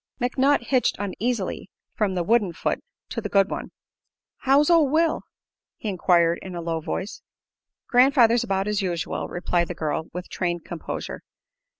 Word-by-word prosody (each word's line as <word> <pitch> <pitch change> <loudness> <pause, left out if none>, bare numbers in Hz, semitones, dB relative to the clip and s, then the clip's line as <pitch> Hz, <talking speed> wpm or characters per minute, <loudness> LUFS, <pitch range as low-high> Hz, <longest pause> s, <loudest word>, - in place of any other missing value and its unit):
McNutt 260 +2 +2
hitched 255 -2 +2
uneasily 205 0 -3 0.2
from 200 -3 0
the 175 - 0
wooden 210 -2 +2
foot - - -1 0.3
to 230 - -3
the 205 - -4
good 195 -1 +3
one. - - -4 0.7
"How's 275 +2 +3
ol' 330 -5 +5
Will?" 320 +2 +2 0.6
he 215 - -4
enquired, 175 -3 +3
in 185 -2 -7
a - - -4
low 165 -1 -2
voice. 185 +5 -4 0.7
"Grandfather's 245 -2 +5
about 195 0 -1
as 210 -1 0
usual," 175 -3 -2
replied 175 -1 0
the 180 - -5
girl, 160 0 -2
with 180 +1 -6
trained 175 -2 -2
composure. 170 - -6
200 Hz, 155 wpm, -24 LUFS, 175-245 Hz, 0.7 s, ol